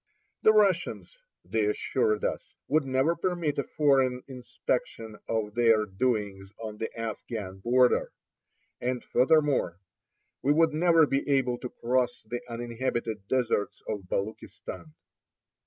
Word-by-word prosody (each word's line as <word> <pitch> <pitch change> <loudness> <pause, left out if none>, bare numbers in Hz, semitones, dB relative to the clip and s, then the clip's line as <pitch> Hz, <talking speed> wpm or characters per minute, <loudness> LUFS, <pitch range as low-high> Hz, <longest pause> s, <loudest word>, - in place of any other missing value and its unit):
The 215 - +6
Russians, 205 - +1 0.3
they - - 0
assured 430 +1 0
us, - - -4
would 155 -2 +2
never 135 +6 +2
permit 170 -5 -1
a - - +1
foreign 135 -4 +2
inspection 120 -3 -4
of 110 -2 -1
their 115 -2 +4
doings 100 -2 -2
on 110 -2 -7
the 110 - -3
Afghan 105 -3 -5
border; 125 +4 +3 0.7
and 125 0 -2
furthermore, 135 - +2 0.6
we 145 - +3
would 160 0 +3
never 165 0 +5
be 140 0 -1
able 130 -3 +2
to 125 - -5
cross 125 0 -1
the 120 +2 -5
uninhabited 115 -3 -3
deserts 120 -5 0
of 100 -4 -5
Baluchistan. 95 -5 -5
125 Hz, 125 wpm, -28 LUFS, 110-145 Hz, 0.7 s, The